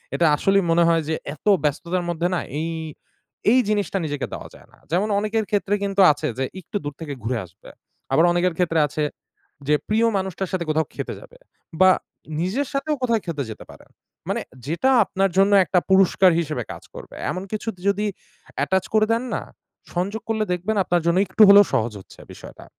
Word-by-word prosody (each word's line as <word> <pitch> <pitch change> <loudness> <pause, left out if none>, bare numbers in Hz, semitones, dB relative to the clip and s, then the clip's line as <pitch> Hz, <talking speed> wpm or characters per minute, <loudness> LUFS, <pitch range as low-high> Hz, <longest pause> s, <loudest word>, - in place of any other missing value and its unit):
এটা 170 - +2
আসলেই 195 +5 +2
মনে 170 +1 +4
হয় 165 -1 +3
যে 160 - +1 0.2
এত - - -30 0.2
ব্যস্ততার 170 +5 -1
মধ্যে 170 +1 0
না - - 0 0.2
এই, 165 +1 -2 0.8
এই 255 - +5
জিনিসটা 205 -2 0
নিজেকে 145 -2 -3
দেওয়া - - -7
যায় - - -17
না, - - -21
যেমন 195 +6 +1
অনেকের 215 +1 -1
ক্ষেত্রে 205 -1 +1
কিন্তু 195 0 +1
আছে 155 +1 -3
যে 135 - 0
একটু 185 +4 -5
দূর 145 -1 -4
থেকে 150 -3 -5
ঘুরে 120 +1 -1
আসবে 90 +4 -17 0.4
আবার 165 - +4
অনেকের 175 0 +1
ক্ষেত্রে 165 -3 +1
আছে 150 +1 -3 0.7
যে 150 - +4
প্রিয় 225 +2 +3
মানুষটার 190 -1 -3
সাথে 185 -2 -1
কোথাও 160 +1 +1
খেতে - - -5
যাবে - - -16 0.5
বা 185 - +8 0.5
নিজের 210 +12 -1
সাথেও 290 +2 -1
কোথাও 235 -3 +2
খেতে 150 -5 -2
যেতে 110 - -9
পারেন, - - -16 0.4
মানে - - -1 0.3
যেটা 170 - +1
আপনার 195 0 0
জন্য 195 +1 +4
একটা 180 - +1
পুরষ্কার 190 -1 +5
হিসেবে 150 -7 -3
কাজ - - -10
করবে, - - -10 0.2
এমন 185 - -4
কিছু 215 +1 -4 0.2
যদি 205 +1 +1 0.6
attach 190 0 0
করে 215 0 +4
দেন 230 +2 +1
না, - - -2 0.5
সংযোগ 200 +5 -2
করলে 220 -1 0
দেখবেন 185 +5 -2
আপনার 175 -1 +1
জন্য 170 +2 +3
একটু 190 +4 +3
হলেও 200 0 +9
সহজ 110 0 0
হচ্ছে - - -17
বিষয়টা। - - -12
185 Hz, 185 wpm, -22 LUFS, 165-205 Hz, 0.8 s, হলেও